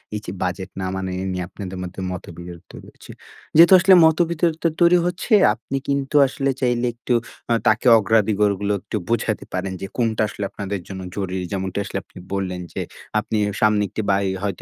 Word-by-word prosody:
এই - - -2
যে - - -5
বাজেট 90 +1 -3
না - - -2
মানা 95 -1 -3
এ - - -3
নিয়ে 90 -1 -3
আপনাদের 95 -2 -7
মধ্যে 90 +1 -7
মতবিরোধ 85 -1 -8
তৈরী - - -12
হচ্ছে। - - -14 0.4
যেহেতু 170 +4 +8
আসলে 190 +2 +6
মতবিরোধ 165 0 +1 0.2
তৈরি 175 +1 +6
হচ্ছে, 180 +6 -2 0.2
আপনি 120 +4 -5
কিন্তু 140 0 -1
আসলে 135 +1 -2
চাইলে 120 -1 +1
একটু 120 +1 -3 0.4
আ - - +5
তাকে 110 +4 +3
অগ্রাধিকারগুলো 105 -1 +1
একটু 105 +1 -4
বুঝাতে 115 -2 -1
পারেন 95 +1 -2
যে 95 - -4
কোনটা 115 -3 0
আসলে 105 -1 -6
আপনাদের 100 -1 -4
জন্য 95 -1 -7
জরুরি। 95 -2 -3
যেমনটা 95 0 -3
আসলে - - -4
আপনি - - -19 0.2
বললেন, 90 -2 -2
যে - - -3 0.4
আপনি 110 +1 -3 0.2
সামনে 105 -1 +4
একটি - - -3
বাড়ি 95 0 +1
হয়তো 100 -3 -3
105 Hz, 180 wpm, -21 LUFS, 95-125 Hz, 0.4 s, যেহেতু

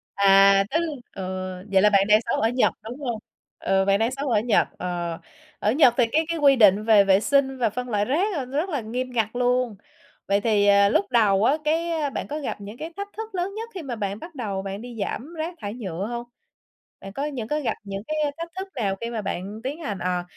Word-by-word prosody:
À! 195 0 +6
Tức 320 - +2 0.4
ừ, 190 - -5 0.5
vậy 190 -1 +5
là 210 - +6
bạn 195 -1 +4
đang 210 0 +6
sống - - +1
ở 225 - +3
Nhật, 245 +1 +2
đúng 240 +5 -8
hông? 240 -6 -3 0.4
Ờ, 195 0 +1
bạn 200 0 +3
đang 225 +2 +1
sống 275 +1 -3
ở 225 -3 +3
Nhật, 220 -1 +2
ờ, 175 -2 -3 0.4
ở 210 - +1
Nhật 255 -2 +5
thì 245 - +5
cái 315 +2 +2
cái 335 - -1
quy 280 -2 +5
định 210 -3 +5
về 215 -2 +6
vệ 195 0 +4
sinh 275 +1 +1
và 235 -4 +1
phân 250 +3 -5
loại 205 -2 +1
rác 345 - +1
là 270 - -2
nó 265 +3 -5
rất 345 +6 0
là 285 -6 -2
nghiêm 250 +4 -4
ngặt 225 -3 0
luôn. 245 -2 +1 0.5
Vậy 200 +1 +2
thì, 210 -2 +2
à, 200 0 +6
lúc 200 - +2
đầu 205 -4 +4
á, 275 +6 +3
cái 320 -1 0
bạn - - -5
có 300 +2 -4
gặp 275 -7 -5
những 205 +3 -9
cái 325 +4 -7
thách 400 - -4
thức 445 -2 -6
lớn 365 +2 -2
nhất 450 +2 -6
khi 370 - -6
mà 265 -6 -5
bạn 205 -1 -3
bắt 330 -2 -11
đầu 205 -7 -3
bạn 195 +1 -6
đi 240 -1 -9
giảm 260 +10 -4
rác 320 +3 -3
thải 205 -1 -4
nhựa 195 -5 -5
hông? 240 0 -4 0.8
Bạn 195 0 -9
có 280 +6 -3
những 255 -7 -4
cái 300 0 -1
gặp 265 - 0
những 195 -1 -5
cái 310 - -2 0.2
thách 335 0 -6
thức 385 - -4
nào 200 -6 -1
khi 230 - -3
mà 230 -2 -3
bạn 200 +2 -5
tiến 280 +5 -4
hành, 210 - -4
ờ, 180 0 -1
230 Hz, 245 wpm, -24 LUFS, 200-285 Hz, 0.8 s, À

